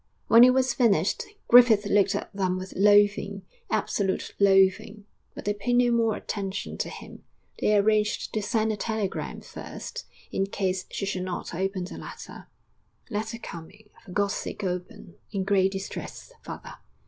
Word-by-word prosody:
When 230 +1 +8
it 255 - +8
was 260 -1 +2
finished, 205 -5 +2 0.2
Griffith 235 -4 +7
looked 200 0 +3
at 205 - -5
them 185 -2 0
with 185 0 -7
loathing, 205 0 +3 0.3
absolute 195 -2 -1
loathing 200 +1 +3 0.3
but - - -8
they 205 - +1
paid 210 +4 -2
no 245 0 +4
more 230 -2 +2
attention 200 -2 -4
to - - -2
him. - - -11 0.4
They 210 - +3
arranged 210 +1 +1
to 215 - 0
send 220 +1 0
a - - -5
telegram 220 -3 -3
first, - - -8 0.2
in 195 - 0
case 190 -2 -2
she 195 - -3
should 190 -2 -2
not 185 -2 -5
open 190 +1 -2
the 180 - -8
letter, - - -10 0.6
'Letter 220 +2 -3
coming; 205 +1 -11
for 190 - -13
God's 200 +1 0
sake 210 - -5
open! 185 +2 -5
In 195 -2 -1
great 195 -1 +2
distress. 195 - -7
FATHER.' - - -9
205 Hz, 160 wpm, -26 LUFS, 190-220 Hz, 0.6 s, When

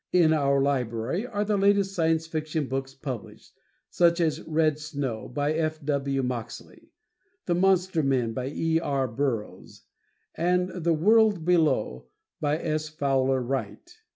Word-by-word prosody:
In 170 -3 +4
our 140 -2 +2
library 135 - -1
are 205 -3 -2
the 210 0 +1
latest 200 0 +2
Science 165 -2 +1
Fiction 155 -1 -3
books 135 0 -4
published, 130 -5 -8 0.4
such 170 0 +3
as 160 -3 0
"Red 155 -1 +1
Snow," 140 -7 -4
by 145 +4 -1
F. 155 0 -1
W. 140 -2 0
Moxley, 120 -2 -6 0.6
"The 175 - +1
Monster 185 -1 +2
Men," 130 -5 0
by 125 +3 -3
E. 160 +3 0
R. 140 -4 -1
Burroughs 115 -2 -4 0.5
and 180 +2 +1
"The 170 -3 0
World 210 0 +3
Below," 135 - +1 0.3
by 150 0 0
S. 155 -1 -2
Fowler 135 -3 0
Wright. 135 - -5
155 Hz, 140 wpm, -26 LUFS, 135-170 Hz, 0.6 s, In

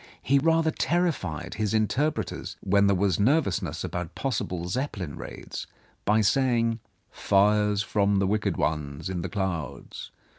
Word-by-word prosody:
He 140 +2 +4
rather 165 +2 +3
terrified 140 - -1
his 110 -1 -1
interpreters, 130 +8 -1
when 100 +1 +3
there 100 - +3
was 95 -2 +1
nervousness 100 - +1
about 90 -2 -4
possible 90 -9 -2
Zeppelin 95 - -3
raids, - - -7 0.4
by 105 +2 +4
saving: 115 0 +2 0.3
"Fires 105 +1 +2
from 100 -1 +1
the 95 - +2
wicked 105 +2 0
ones 75 +3 -2
in 90 -2 -2
the 95 - -4
clouds. 85 -8 -4
100 Hz, 135 wpm, -27 LUFS, 90-120 Hz, 0.4 s, He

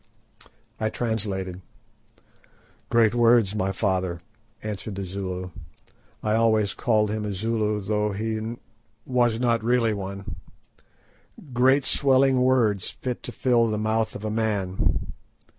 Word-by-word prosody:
I 110 - 0
translated. 100 -6 -2 1.3
"Great 115 -2 +4
words, 115 -4 +4
my 95 -2 0
father," 95 -3 -1 0.4
answered 105 -1 -5
the 95 0 -4
Zulu—I 90 +1 -6
always 110 -2 +2
called 105 -3 +1
him 110 0 -2
a 105 - -3
Zulu, 105 +1 -1
though 105 +1 0
he 110 +2 -3 0.5
was 120 -3 +2
not 115 -2 +1
really 115 -1 +2
one—"great 120 +6 -3
swelling 135 -1 +3
words 120 -7 +2
fit 125 -2 -5
to - - -6
fill 120 -4 +2
the 105 - -1
mouth 110 +1 0
of 105 - -6
a 110 - -2
man. 105 -4 -1
110 Hz, 115 wpm, -25 LUFS, 100-115 Hz, 1.3 s, Great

